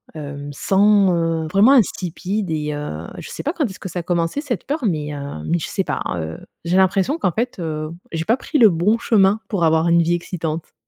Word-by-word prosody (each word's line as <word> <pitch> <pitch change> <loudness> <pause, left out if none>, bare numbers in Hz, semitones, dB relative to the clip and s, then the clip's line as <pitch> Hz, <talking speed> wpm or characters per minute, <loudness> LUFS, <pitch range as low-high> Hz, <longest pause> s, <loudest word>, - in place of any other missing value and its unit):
hem, 145 -1 -7
sans, 195 +2 +3
heu, 165 -1 0
vraiment, 210 +7 +6
insipide 195 - 0
et 150 -1 -2
heu, 85 - -5
je - - -9
sais - - -6
pas 300 +4 -1
quand 320 - -1
est-ce 195 -3 -7
que 190 - -6
ça 175 - -4
a 170 - -5
commencé 170 - -1
cette 280 -5 -4
peur, 290 -1 -3
mais, 150 -5 -1
heu, 140 - -6
mais 170 - +1
je - - -4
sais 195 - -1
pas. - - -2
Heu, 80 -1 -5 0.3
j'ai 175 - +1
l'impression 195 - +2
qu'en 185 - +1
fait, 235 +1 -3
heu, 155 -2 -3 0.2
j'ai 165 0 -3
pas 230 +3 +2
pris 295 - -2
le 225 -4 +8
bon 185 +7 +2
chemin 205 -2 +3
pour 195 -6 -1
avoir 160 +1 +3
une 170 0 +5
vie 170 +1 +2
excitante. 165 -2 -4
175 Hz, 225 wpm, -20 LUFS, 160-205 Hz, 0.3 s, le